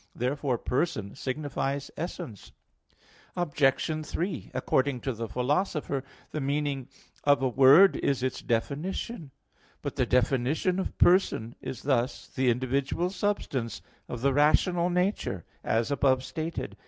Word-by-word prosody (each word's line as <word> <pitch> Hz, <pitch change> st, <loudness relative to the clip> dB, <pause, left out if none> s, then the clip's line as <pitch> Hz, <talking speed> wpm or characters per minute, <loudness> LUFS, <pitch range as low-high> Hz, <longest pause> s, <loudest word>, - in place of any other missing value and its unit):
Therefore 130 Hz, +1 st, -1 dB
person 110 Hz, -, -1 dB
signifies 140 Hz, 0 st, -3 dB
essence. 165 Hz, -, -6 dB, 0.8 s
Obj. 155 Hz, -1 st, +1 dB
3: 175 Hz, +2 st, -3 dB
According 130 Hz, -1 st, +1 dB
to 135 Hz, -, -2 dB
the 115 Hz, 0 st, -4 dB
Philosopher 145 Hz, -, -1 dB
(Metaph. -, -, -27 dB, 0.2 s
iv), -, -, -36 dB
the 155 Hz, -, -3 dB
meaning 140 Hz, -1 st, -1 dB, 0.4 s
of 145 Hz, -2 st, +4 dB
a -, -, +4 dB
word 140 Hz, -, +7 dB
is 135 Hz, -2 st, 0 dB
its 130 Hz, -, -2 dB
definition. 150 Hz, -, -2 dB, 0.5 s
But -, -, -4 dB
the -, -, +2 dB
definition 135 Hz, +9 st, +1 dB
of 190 Hz, -, -4 dB
"person" 175 Hz, -, +3 dB
is 130 Hz, -2 st, -6 dB
this: 130 Hz, -2 st, 0 dB
"The 130 Hz, -1 st, +1 dB
individual 135 Hz, +8 st, 0 dB
substance 180 Hz, -, -2 dB, 0.3 s
of 120 Hz, -, -5 dB
the 135 Hz, +1 st, +3 dB
rational 170 Hz, +5 st, +3 dB
nature," 180 Hz, -, -1 dB, 0.2 s
as 115 Hz, +4 st, 0 dB
above 130 Hz, -2 st, +2 dB
stated. 160 Hz, +4 st, -5 dB
140 Hz, 130 wpm, -28 LUFS, 125-160 Hz, 0.8 s, word